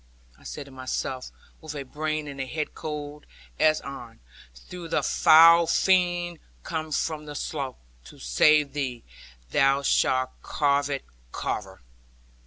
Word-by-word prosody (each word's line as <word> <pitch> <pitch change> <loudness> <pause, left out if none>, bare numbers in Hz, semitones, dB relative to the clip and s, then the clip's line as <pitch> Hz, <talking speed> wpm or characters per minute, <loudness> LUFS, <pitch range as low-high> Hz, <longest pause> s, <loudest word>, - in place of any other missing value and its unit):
I - - -22
said 145 - -7
to 140 - -14
myself 130 0 -4 0.3
with 155 -1 -7
a 140 - -4
brain 155 +2 -3
and 140 -1 -6
head 150 +4 -4
cold 150 -1 -7 0.3
as 155 0 +4
iron; 130 - -9 0.5
'though 180 -2 -7
the - - 0
foul 165 +1 +7
fiend 175 -1 +2 0.2
come 155 -1 -4
from 150 0 -2
the 145 - -7
slough, 140 -3 -4 0.3
to - - -14
save 140 - +3
thee; 130 -5 -3 0.5
thou 135 +1 +3
shalt 130 -1 +2
carve 145 -1 +1
it, 140 -1 -3 0.3
Carver.' 95 -2 -4
145 Hz, 135 wpm, -26 LUFS, 135-155 Hz, 0.5 s, foul